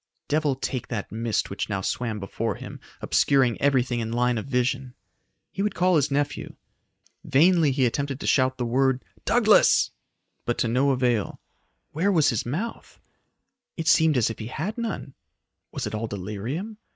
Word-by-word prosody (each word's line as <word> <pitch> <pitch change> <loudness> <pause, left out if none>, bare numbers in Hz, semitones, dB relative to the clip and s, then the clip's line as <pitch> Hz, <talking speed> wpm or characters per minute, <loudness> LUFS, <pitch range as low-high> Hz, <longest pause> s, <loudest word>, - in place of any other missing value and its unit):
Devil 150 -2 +1
take 130 -1 -4
that 110 -4 -4
mist 115 -2 -1
which 100 - -3
now 100 -2 -1
swam 110 +2 -2
before 105 +2 -3
him, - - -9 0.2
obscuring 130 -5 +2
everything 130 -3 +2
in 115 -1 -3
line 120 0 +1
of 110 - -7
vision. 125 0 -1 0.6
He 195 - -4
would 210 +1 -1
call 180 0 +3
his 150 -2 +2
nephew. 145 +1 -2 0.7
Vainly 160 +1 +4
he 130 -1 +2
attempted 140 +2 -2
to - - -6
shout 130 -1 +2
the 125 - -2
word 130 +2 +1 0.2
"Douglas," - - +4 0.5
but 120 - -1
to - - +1
no 130 +5 +2
avail. 125 -5 0 0.5
Where 180 +7 +1
was 160 -6 +4
his 120 -2 -2
mouth? 185 - -5 0.8
It 165 -1 -4
seemed 160 -5 +5
as 115 -2 +2
if - - -9
he 110 - -5
had 160 - -4
none. 225 - -4 0.6
Was - - -4
it - - -5
all 110 +1 -2
delirium? 110 - -5
130 Hz, 165 wpm, -25 LUFS, 115-150 Hz, 0.8 s, seemed